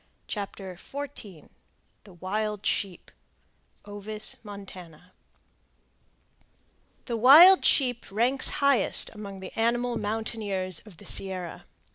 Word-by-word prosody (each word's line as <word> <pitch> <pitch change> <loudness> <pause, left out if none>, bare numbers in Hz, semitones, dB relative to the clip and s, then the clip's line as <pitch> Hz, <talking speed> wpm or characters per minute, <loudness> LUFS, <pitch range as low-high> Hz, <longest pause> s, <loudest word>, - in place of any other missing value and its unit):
CHAPTER 195 -2 -6
XIV 260 - -9 0.6
THE 195 - -15
WILD 210 +3 -4
SHEEP 190 -3 -2 0.7
(Ovis 205 +1 -5
montana) 185 -4 -12 1.9
The 235 - -3
wild 315 - +8
sheep 245 -4 +2
ranks 245 +6 +2 0.2
highest 280 -3 +3
among 200 -3 -9
the 185 - -9
animal 240 +1 0
mountaineers 205 -4 -3
of 190 -6 -15
the - - -15
Sierra. 185 -3 0
210 Hz, 95 wpm, -26 LUFS, 190-235 Hz, 1.9 s, wild